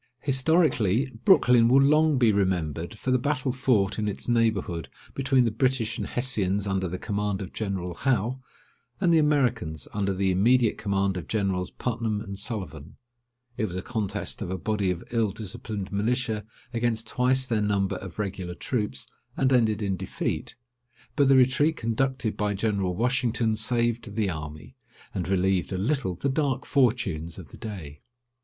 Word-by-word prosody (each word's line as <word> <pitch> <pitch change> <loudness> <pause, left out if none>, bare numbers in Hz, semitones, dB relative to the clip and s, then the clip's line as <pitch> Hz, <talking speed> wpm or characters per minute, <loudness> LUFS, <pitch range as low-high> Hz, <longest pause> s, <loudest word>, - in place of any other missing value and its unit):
Historically, 135 - +2
Brooklyn 120 -2 +6
will 130 +3 +6
long 150 +1 +4
be 120 -3 +4
remembered 90 -2 -1
for 130 - -2
the 130 - +3
battle 140 0 0
fought 110 -6 +1
in 105 - -1
its 100 - -5
neighbourhood 110 -8 0 0.2
between 135 -2 +2
the 115 - +1
British 120 -1 0
and - - -3
Hessians 105 -6 0
under 95 -1 -1
the 90 +2 -4
command 105 -1 -2
of 95 - -7
General 95 -4 -3
Howe, 125 +3 0 0.6
and 175 -3 +3
the 165 - +6
Americans 125 - +1
under 100 -1 0
the 95 0 +1
immediate 115 +5 +3
command 95 -2 0
of 85 - -6
Generals 95 -4 -1
Putnam 115 -3 -2
and 100 -2 -6
Sullivan. 95 - -5 0.6
It 110 - 0
was 90 -4 -5
a 95 - -3
contest 105 -5 -3
of 100 - -3
a 95 - -2
body 105 0 -1
of 90 -2 -2
ill 115 -3 +2
disciplined 100 0 -5
militia 110 +1 -1 0.3
against 115 -1 0
twice 130 +1 +2
their 115 -4 0
number 100 -2 0
of 95 -4 -9
regular 95 -4 -4
troops, 110 -1 -2 0.3
and 135 0 +3
ended 110 -4 +2
in 95 -2 -1
defeat; 95 +1 -3 0.6
but 140 -3 +4
the 135 - +6
retreat 130 +5 +4
conducted 120 0 -1
by 105 -1 -1
General 100 -3 0
Washington 120 -1 +1
saved 115 -1 0
the 105 -4 +1
army, 75 -1 -8 0.4
and 95 -1 -3
relieved 95 -2 +1
a 95 - -1
little 110 -2 -1
the 115 - -2
dark 140 -1 0
fortunes 115 - +1
of 85 -7 -10
the - - -11
day. 85 -10 -8
110 Hz, 165 wpm, -26 LUFS, 95-125 Hz, 0.6 s, Brooklyn